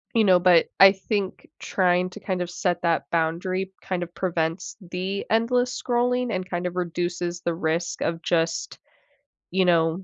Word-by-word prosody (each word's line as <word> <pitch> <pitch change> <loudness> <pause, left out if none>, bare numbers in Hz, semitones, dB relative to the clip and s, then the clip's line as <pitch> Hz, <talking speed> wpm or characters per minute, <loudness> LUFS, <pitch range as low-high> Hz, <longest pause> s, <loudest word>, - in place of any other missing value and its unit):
You 225 - +4
know, 185 -3 +5
but 175 -2 +5
I 195 - +11
think 195 0 -3
trying 180 -1 +1
to, 210 - -11
kind 185 -3 -2
of, 175 - -5
set 175 -1 -1
that 165 -3 0
boundary, 180 +3 -1
kind 185 -2 -3
of, 175 0 -6
prevents 170 -2 -2
the 185 +2 -4
endless 245 +3 +1
scrolling 245 0 0
and, 185 0 -3
kind 175 0 -3
of, 180 - -4
reduces 175 0 -3
the 170 - -1
risk 165 0 -2
of, 165 0 -1
just, 165 0 -1 0.7
you 185 +1 +2
know 165 +1 +2
180 Hz, 165 wpm, -24 LUFS, 170-190 Hz, 0.7 s, I